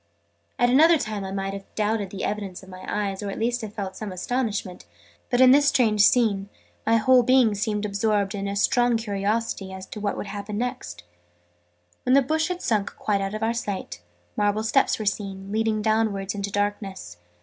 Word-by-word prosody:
At 245 0 +3
another 320 +5 +6
time 215 -6 -4
I 190 - -5
might 195 0 -3
have 195 0 -10
doubted 210 -2 0
the 190 0 -6
evidence 200 -3 -4
of 190 - -14
my 185 0 -10
eyes, 200 -2 -2
or 205 - -4
at 195 - -5
least 240 +2 -1
have 210 -2 -7
felt 190 -2 -4
some 210 0 -6
astonishment: 205 - -3 0.4
but, 245 - +1
in 255 -1 +8
this 285 +1 +5
strange 230 -7 +3
scene, 205 -3 +3 0.4
my 230 0 +5
whole 255 +3 +5
being 250 -2 +4
seemed 210 0 -1
absorbed 205 -1 0
in 200 0 -3
strong 240 +3 +3
curiosity 205 -1 -2
as 190 0 -8
to 210 - -8
what 205 -1 -2
would - - -4
happen 205 +1 -5
next. 85 - -4 1.0
When 255 - +1
the 275 - +5
bush 315 +4 0
had 360 0 -4
sunk 210 -4 0
quite 200 -2 -1
out 195 +2 -3
of 215 - -4
our 225 +1 +1
sight, 205 - -5 0.3
marble 205 +1 +1
steps 220 - +2
were 215 - -5
seen, 195 -1 -3
leading 220 0 0
downwards 215 -3 0
into 200 -1 -3
darkness. 200 - -3
210 Hz, 195 wpm, -24 LUFS, 195-230 Hz, 1.0 s, in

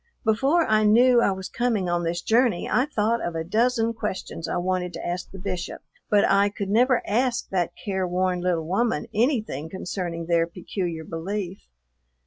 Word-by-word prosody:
Before 270 +10 +3
I 215 0 +3
knew 240 +3 +5
I - - +3
was 190 0 -5
coming 230 -6 0
on 175 0 0
this 170 +1 -2
journey 230 -5 +2
I 255 +3 +2
thought 230 -4 0
of 175 - -3
a 160 - -2
dozen 230 +5 +1
questions 210 -6 -4
I - - -1
wanted 180 0 -1
to - - -6
ask 175 +1 -3
the 190 - -10
Bishop, 180 -2 -5 0.3
but 205 -1 +4
I 200 +1 +4
could 200 -1 -5
never 245 +3 +3
ask 240 +3 0
that 180 -3 -1
care 190 -3 -2
worn 180 0 0
little 175 -3 0
woman 225 +8 0
anything 215 - 0
concerning 175 -2 -4
their 170 0 +2
peculiar 170 -1 -4
belief. 185 +4 -4
195 Hz, 175 wpm, -25 LUFS, 175-225 Hz, 0.3 s, knew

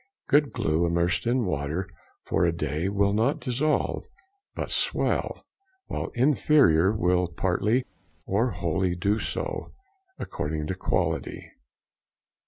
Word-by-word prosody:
Good 145 0 +4
glue 85 -7 +1
immersed 85 +4 0
in 120 -1 +2
water 75 +2 -2 0.4
for - - 0
a 85 - +3
day 80 +2 -2
will 100 0 +2
not 110 +2 +1
dissolve, 140 +5 0 0.5
but - - -4
swell, - - 0 0.4
while - - -3
inferior 125 - +4
will 90 -3 +1
partly 105 +8 0 0.4
or 115 +6 +1
wholly 90 -1 -1
do 100 +5 +1
so, - - -3 0.5
according 75 +1 -3
to 95 - -2
quality. 95 - -2
95 Hz, 115 wpm, -26 LUFS, 85-115 Hz, 0.5 s, Good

